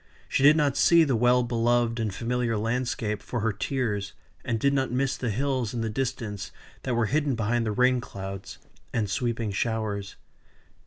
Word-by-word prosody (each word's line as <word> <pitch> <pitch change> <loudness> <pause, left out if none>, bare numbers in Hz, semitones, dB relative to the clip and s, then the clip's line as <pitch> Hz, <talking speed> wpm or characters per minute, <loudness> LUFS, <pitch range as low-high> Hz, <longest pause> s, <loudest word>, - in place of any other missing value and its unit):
She - - 0
did 145 +3 +7
not 145 -3 +2
see 170 -1 +6
the 135 -5 +1
well 125 +2 +4
beloved 120 0 +1
and 110 -2 -1
familiar 115 +2 -1
landscape 115 -2 -1
for 120 - -4
her 110 0 +1
tears, 105 -3 -2 0.3
and 115 -2 -1
did 140 +4 +2
not 135 -1 +1
miss 135 +2 0
the 125 - -3
hills 125 0 -1
in 115 - -1
the 115 -1 -2
distance 105 -6 -3 0.3
that 125 -2 -1
were 120 -1 +2
hidden 145 +3 +1
behind 115 +1 0
the - - 0
rain 125 +3 +3
clouds, 95 -3 -7 0.3
and 110 -3 0
sweeping 115 -1 -1
showers. 105 -2 -2
120 Hz, 175 wpm, -27 LUFS, 110-130 Hz, 0.3 s, did